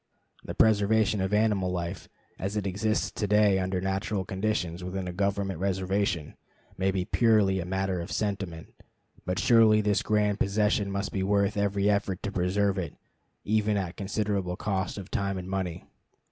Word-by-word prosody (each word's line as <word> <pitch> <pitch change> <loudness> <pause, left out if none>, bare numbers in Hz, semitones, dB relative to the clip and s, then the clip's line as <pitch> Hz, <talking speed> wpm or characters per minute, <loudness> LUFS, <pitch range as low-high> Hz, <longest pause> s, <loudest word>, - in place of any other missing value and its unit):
The - - -6
preservation 110 -1 +3
of 95 +1 -1
animal 105 -3 +2
life, 90 0 -4 0.3
as 100 +3 -3
it 105 - -2
exists 105 +3 0
to 105 - -2
day 105 -1 +4
under 95 0 -1
natural 95 +1 -2
conditions 95 -3 -2
within 90 0 -4
a 90 - -4
government 100 -1 -1
reservation, 95 -3 -1 0.4
may 95 +1 0
be 95 -2 -1
purely 105 -5 +3
a 85 - -3
matter 95 -1 -1
of 85 - -7
sentiment; 95 -6 -3 0.5
but 90 0 -1
surely 110 -2 +5
this 105 -1 +1
grand 105 -1 +1
possession 105 0 +1
must 100 +1 -3
be 95 - -2
worth 100 +2 +1
every 100 0 +1
effort 100 -3 0
to 100 - -2
preserve 95 +1 +1
it, 85 -5 -5 0.5
even 105 0 +1
at 95 -2 -3
considerable 100 -2 -2
cost 95 -1 -2
of 100 -1 -8
time 100 -1 -1
and 90 0 -6
money. 90 -3 -3
100 Hz, 165 wpm, -28 LUFS, 95-105 Hz, 0.5 s, surely